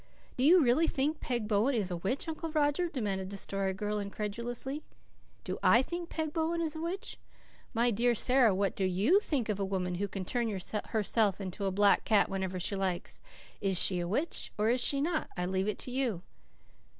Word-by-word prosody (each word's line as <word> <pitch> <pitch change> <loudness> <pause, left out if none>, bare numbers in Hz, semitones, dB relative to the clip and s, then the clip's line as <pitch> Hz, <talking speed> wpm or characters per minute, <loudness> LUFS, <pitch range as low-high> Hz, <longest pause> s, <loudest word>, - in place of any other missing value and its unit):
"Do 255 - -1
you 335 +3 +7
really 270 +7 +3
think 295 +3 0
Peg 240 -4 -2
Bowen 220 +6 +2
is 200 -5 -1
a 175 - -2
witch, 195 - -2
Uncle 325 +1 -4
Roger?" 305 +3 +1
demanded 200 - -2
the 200 - -6
Story 195 0 -1
Girl 210 +1 -2
incredulously. 235 +7 -4 0.6
"Do - - -4
I 240 - +5
think 345 +3 -5
Peg 315 -2 -3
Bowen 330 +1 0
is 320 -2 -2
a 315 - -5
witch? 355 +4 -4 0.6
My 235 +1 +3
dear 240 +3 +2
Sara, 250 -3 +3
what 195 0 0
do 195 - -1
YOU 195 - +3
think 285 - -1
of 210 -2 -2
a - - 0
woman 185 -2 -2
who 205 - 0
can 195 -1 -5
turn 240 +2 -1
herself 210 +1 0
into 195 0 -4
a 195 - +1
black 200 +1 +4
cat 210 -3 +3
whenever 190 -1 -3
she 195 +3 -1
likes? 190 -3 -3 0.4
Is 195 -2 +1
she 185 -2 +3
a 175 - -2
witch? 285 - -2
Or 215 +2 +2
is 250 0 +2
she 275 +2 +2
not? 320 +1 -1
I 180 - -1
leave 190 +2 -1
it 210 - -1
to 250 - -3
you." 245 -9 -1
220 Hz, 205 wpm, -31 LUFS, 195-280 Hz, 0.6 s, you